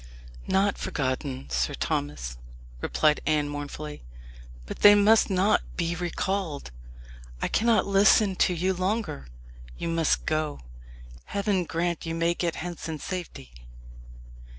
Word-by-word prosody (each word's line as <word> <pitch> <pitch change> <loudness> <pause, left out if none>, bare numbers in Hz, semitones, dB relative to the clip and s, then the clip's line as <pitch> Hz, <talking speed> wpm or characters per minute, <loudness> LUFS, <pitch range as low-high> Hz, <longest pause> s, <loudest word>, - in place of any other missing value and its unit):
"Not 200 +1 +2
forgotten, 130 -1 -3
Sir 60 0 0
Thomas," 60 -4 -3 0.4
replied 150 -1 +2
Anne 150 -1 +2
mournfully; 145 +1 -6 0.6
"but - - -7
they 205 0 +9
must 215 +2 +5
not 195 +2 +3 0.2
be 170 -1 0
recalled. 175 - -3 0.7
I - - 0
cannot 230 0 +2
listen 200 0 +4
to 180 - +3
you 185 +3 +1
longer. 185 - -2 0.5
You 170 - -3
must 165 -2 +1
go. 155 - -1 0.6
Heaven 200 -3 0
grant 170 0 -2
you 165 - -2
may 165 +1 +1
get 170 -1 -2
hence 175 -1 -6
in 160 - -3
safety!" 165 - -7
170 Hz, 125 wpm, -27 LUFS, 145-195 Hz, 0.7 s, they